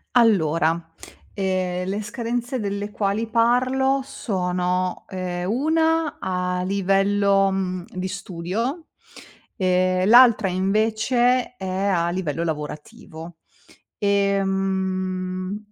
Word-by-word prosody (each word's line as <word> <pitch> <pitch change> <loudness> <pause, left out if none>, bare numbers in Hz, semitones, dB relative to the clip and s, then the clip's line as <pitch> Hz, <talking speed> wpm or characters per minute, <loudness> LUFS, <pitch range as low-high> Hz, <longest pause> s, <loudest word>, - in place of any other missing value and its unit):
Allora, 165 -7 +2 0.4
ehm, 185 -2 -1
le 205 +3 -2
scadenze 240 +3 -3
delle 205 0 -3
quali 205 +2 -1
parlo 255 +4 +2
sono, 180 -6 -2
ehm, 180 -1 -4
una 320 +5 +1
a 180 0 -2
livello, 195 +1 +2
uhm, 185 -2 -2
di 185 0 -4
studio 200 - -4 0.7
e 185 -1 +1
l'altra 235 -2 +6
invece 220 +6 +1
è 195 - -7
a 185 -2 0
livello 170 -3 -2
lavorativo. 160 +2 -7 0.6
Ehm, 190 -1 -1
195 Hz, 90 wpm, -23 LUFS, 180-225 Hz, 0.7 s, l'altra